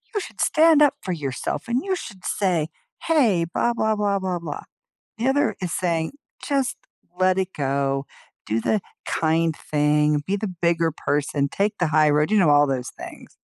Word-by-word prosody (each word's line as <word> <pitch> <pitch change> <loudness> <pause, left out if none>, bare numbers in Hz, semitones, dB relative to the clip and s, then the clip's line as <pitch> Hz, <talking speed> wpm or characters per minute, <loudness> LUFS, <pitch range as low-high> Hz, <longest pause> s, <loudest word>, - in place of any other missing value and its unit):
"You - - +2
should - - -8
stand 320 -1 +5
up 290 -2 +5
for 185 - -3
yourself, 140 -6 -4
and 240 +3 0
you 385 - 0
should 195 - -9
say, 175 -6 0 0.3
'Hey, 235 - +3
blah, 240 - +1
blah, 220 -2 +1
blah, 205 -1 +1
blah, 185 -2 -2
blah.'" 160 -4 -6 0.5
The 235 +3 -1
other 285 +2 +2
is 175 -2 -3
saying, 165 -3 -1 0.3
"Just 275 -3 0 0.4
let 185 0 +3
it 190 0 -2
go. 135 -1 -1 0.4
Do 110 +1 -1
the 215 - +1 0.3
kind 160 0 +1
thing. 150 0 +1
Be 200 - +1
the 210 +1 -3
bigger 170 -1 +2
person, 145 -1 -1
take 205 +1 -1
the 175 - +2
high 155 0 +4
road," 150 +1 +2
you 215 - +4
know, 170 -6 +4
all 145 0 +5
those 130 -2 -2
things. - - -11
170 Hz, 180 wpm, -23 LUFS, 150-215 Hz, 0.5 s, stand